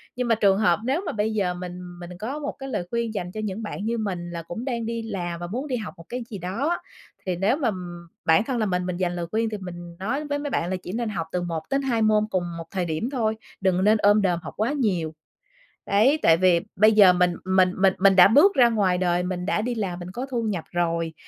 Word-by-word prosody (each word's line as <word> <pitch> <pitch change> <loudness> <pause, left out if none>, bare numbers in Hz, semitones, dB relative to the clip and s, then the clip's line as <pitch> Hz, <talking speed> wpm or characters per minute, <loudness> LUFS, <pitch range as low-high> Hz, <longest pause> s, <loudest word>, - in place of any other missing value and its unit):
Nhưng 250 0 -2
mà 230 - +4
trường 200 -3 +3
hợp 205 -4 +3
nếu 275 +9 0
mà - - -2
bây 215 +1 -1
giờ 195 -4 0
mình 180 0 -8
mình 175 0 -9
có 255 +8 -4
một 290 -1 -3
cái 270 0 -6
lời 175 -9 -3
khuyên 235 0 -2
dành 180 -4 -4
cho 215 - -5
những 210 +1 -4
bạn 210 -1 -5
như 235 +1 -1
mình 200 -5 -2
là 170 -1 -5
cũng 175 +9 -6
đang 235 -4 -2
đi 230 0 -3
làm 180 -6 -4
và 175 - -5
muốn 250 +10 -4
đi 260 - -1
học 215 -3 -6
một 165 - -13
cái 250 0 -4
gì 215 - -6
đó 190 - -2
á, 345 - +1 0.5
thì 185 -2 -1
nếu 195 +8 +2
mà 255 -8 +1 0.5
bản 160 +4 +5
thân 255 +1 -2
là 220 - +1
mình 180 -2 -1
mình 180 -1 -3
dành 175 -1 -1
lời 175 -1 -3
khuyên 225 +1 0
thì 215 - -4
mình 175 -2 -9
nói 260 +10 -2
với 290 0 -2
mấy 290 0 -3
bạn 175 -9 -1
là 190 - -1
chỉ - - -6
nên 230 0 -2
học 170 -6 -3
từ 180 - -1
1-2 230 - -1
môn 215 -1 +4
cùng 185 -4 0
một 165 - -5
thời 185 -2 -1
điểm 160 +8 -2
thôi, 225 -5 0 0.3
đừng 190 -1 +2
nên 215 +2 +5
ôm 205 0 +4
đồm 180 -4 +1
học - - -7
quá 220 +5 +1
nhiều. 185 - 0 0.7
Đấy, 240 +10 +3
tại 165 0 +5
vì 180 -1 +4 0.2
bây 215 +3 +6
giờ 205 -4 +7
mình 180 0 +2
mình 185 -1 +3
mình 195 -1 +5
mình 195 0 +5
đã 180 - +9
bước 295 - +6
ra 245 -2 +6
ngoài 200 -5 +2
đời, 180 -1 +1
mình 180 0 -3
đã 210 +2 0
đi 240 +2 -2
làm 190 -5 -3
mình 175 0 -7
có 245 +6 -4
thu 245 -3 -1
nhập 200 -7 -2
rồi, 170 -2 -1
200 Hz, 265 wpm, -24 LUFS, 180-230 Hz, 0.7 s, đã